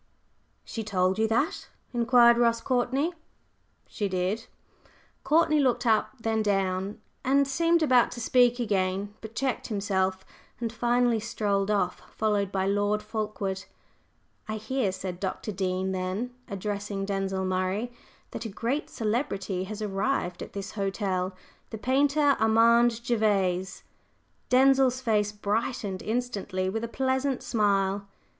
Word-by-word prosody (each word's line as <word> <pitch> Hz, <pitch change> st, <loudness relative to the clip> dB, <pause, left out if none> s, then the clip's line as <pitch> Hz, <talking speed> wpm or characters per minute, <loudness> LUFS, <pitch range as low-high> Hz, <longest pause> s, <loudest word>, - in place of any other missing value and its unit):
"She 225 Hz, -, -5 dB
told 190 Hz, -1 st, +1 dB
you 220 Hz, -, +3 dB
that?" 230 Hz, +8 st, 0 dB, 0.3 s
inquired 235 Hz, 0 st, +5 dB
Ross 230 Hz, -1 st, +3 dB
Courtney. 260 Hz, +7 st, 0 dB, 0.7 s
"She 205 Hz, -2 st, -3 dB
did." 185 Hz, +4 st, -1 dB, 0.8 s
Courtney 305 Hz, +1 st, +3 dB
looked 255 Hz, -3 st, +2 dB
up, 220 Hz, -2 st, +3 dB
then 225 Hz, -1 st, 0 dB
down, 195 Hz, 0 st, 0 dB, 0.2 s
and 275 Hz, +1 st, +3 dB
seemed 335 Hz, +4 st, +2 dB
about 255 Hz, -5 st, +4 dB
to 240 Hz, -, -7 dB
speak 245 Hz, +1 st, +4 dB
again, 200 Hz, -2 st, -1 dB
but 220 Hz, 0 st, -9 dB
checked 265 Hz, -2 st, -1 dB
himself 190 Hz, -3 st, -1 dB, 0.3 s
and 230 Hz, -2 st, -3 dB
finally 240 Hz, 0 st, +2 dB
strolled 205 Hz, -3 st, -1 dB
off, 195 Hz, -4 st, 0 dB
followed 205 Hz, -3 st, 0 dB
by 190 Hz, -1 st, 0 dB
Lord 205 Hz, +1 st, +1 dB
Fulkeward. 210 Hz, -3 st, -3 dB, 0.8 s
"I 215 Hz, -, -3 dB
hear," 220 Hz, -1 st, -1 dB
said 185 Hz, -1 st, -5 dB
Dr. 195 Hz, +2 st, -3 dB
Dean 190 Hz, -1 st, -1 dB
then, 190 Hz, +6 st, -3 dB
addressing 200 Hz, -1 st, -3 dB
Denzil 195 Hz, -1 st, -1 dB
Murray, 185 Hz, +5 st, -1 dB, 0.4 s
"that -, -, -5 dB
a 225 Hz, -, -4 dB
great 240 Hz, +9 st, -2 dB
celebrity 200 Hz, -5 st, -2 dB
has 215 Hz, +2 st, -6 dB
arrived 195 Hz, -2 st, -1 dB
at -, -, -8 dB
this 200 Hz, 0 st, -5 dB
hotel 195 Hz, -2 st, -2 dB, 0.3 s
the 220 Hz, -, -6 dB
painter, 280 Hz, +4 st, +3 dB
Armand 230 Hz, +1 st, +4 dB
Gervase." 195 Hz, -6 st, 0 dB, 0.7 s
Denzil's 265 Hz, 0 st, +4 dB
face 210 Hz, -5 st, +1 dB
brightened 210 Hz, -1 st, -2 dB
instantly 205 Hz, -5 st, -2 dB
with 225 Hz, +2 st, -3 dB
a -, -, -1 dB
pleasant 265 Hz, +2 st, -1 dB
smile. 200 Hz, -2 st, +1 dB
215 Hz, 130 wpm, -27 LUFS, 195-240 Hz, 0.8 s, inquired